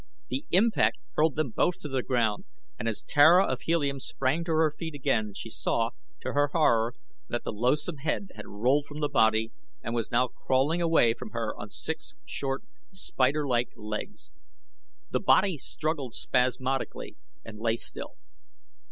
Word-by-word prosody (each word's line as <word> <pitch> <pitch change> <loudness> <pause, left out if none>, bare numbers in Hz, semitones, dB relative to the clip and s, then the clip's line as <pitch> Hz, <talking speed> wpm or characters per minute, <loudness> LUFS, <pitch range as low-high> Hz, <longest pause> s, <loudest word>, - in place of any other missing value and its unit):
The 275 +3 -3
impact 220 +5 +3 0.2
hurled 155 -1 +2
them 155 -5 -1
both 175 +9 +1
to - - -5
the 135 -2 -1
ground 110 -2 0 0.3
and 115 - -2
as 110 - -3
Tara 165 +6 +6
of 130 - -2
Helium 145 -5 0
sprang 135 +5 -1
to 170 - -2
her 155 -1 +3
feet 160 0 -6
again 110 -7 0
she - - -7
saw, - - 0 0.3
to - - -3
her 145 0 +3
horror, 120 -7 +3 0.3
that 120 - -2
the - - -3
loathsome 130 +9 0
head 155 +7 -2
had - - -9
rolled 130 +8 +1
from 150 +1 -8
the 150 - +1
body 110 -4 +3 0.3
and 115 - -3
was 115 -2 -1
now 125 +2 +3
crawling 135 +7 0
away 165 -9 +4
from - - -8
her 115 -2 -2
on 105 - -8
six 160 - -5
short, 135 +6 -3 0.3
spider 145 -6 0
like 120 -2 +1
legs. 110 - -6 0.8
The - - +1
body 190 -2 +4
struggled 150 -4 -3
spasmodically 130 +1 -1 0.3
and 105 -1 -9
lay 115 0 +1
still. - - -6
135 Hz, 165 wpm, -28 LUFS, 115-155 Hz, 0.8 s, Tara